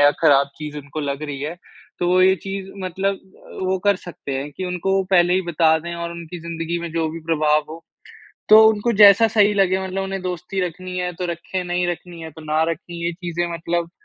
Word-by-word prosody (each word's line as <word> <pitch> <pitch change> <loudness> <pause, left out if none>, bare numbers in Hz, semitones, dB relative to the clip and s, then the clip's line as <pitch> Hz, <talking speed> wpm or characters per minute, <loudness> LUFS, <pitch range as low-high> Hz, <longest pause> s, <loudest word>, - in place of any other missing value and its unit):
या 145 0 +7
खराब 140 -3 +4
चीज़ 150 -1 -6
उनको 145 +2 -7
लग 140 0 -3
रही 145 -2 -5
है। 155 +5 -4 0.4
तो 175 - 0
वो 185 +1 +4
ये 190 +1 +6
चीज़ 195 0 -5
मतलब 190 +2 -1 0.4
वो 185 0 0
कर 200 -2 +4
सकते 170 -6 -8
हैं 140 +2 -4
कि 190 - -4
उनको 180 +1 -2
वो 195 - +2
पहले 175 -1 +4
ही 190 - +1
बता 160 -1 +3
दें 170 +2 -6
और 170 0 -4
उनकी 170 0 -8
ज़िंदगी 165 0 -4
में 170 - -5
जो 165 -1 0
भी 165 +1 -7
प्रभाव 155 -2 +2
हो। 165 +1 -9 0.7
तो 215 +1 +9
उनको 220 +2 +1
जैसा 205 +3 +8
सही 210 -1 +4
लगे 190 -1 +2
मतलब 190 +1 -3
उन्हें 195 0 -4
दोस्ती 180 +1 -4
रखनी 185 +1 -7
है 180 0 -2
तो 180 +1 -4
रखें, 175 +2 -4
नहीं 175 0 -1
रखनी 175 -1 -6
है 160 0 -7
तो 160 - -13
ना 155 +1 +1
रखें। 170 +2 -7
ये 170 0 -2
चीज़ें 175 -1 -3
मतलब 170 0 -2
175 Hz, 220 wpm, -21 LUFS, 160-185 Hz, 0.7 s, तो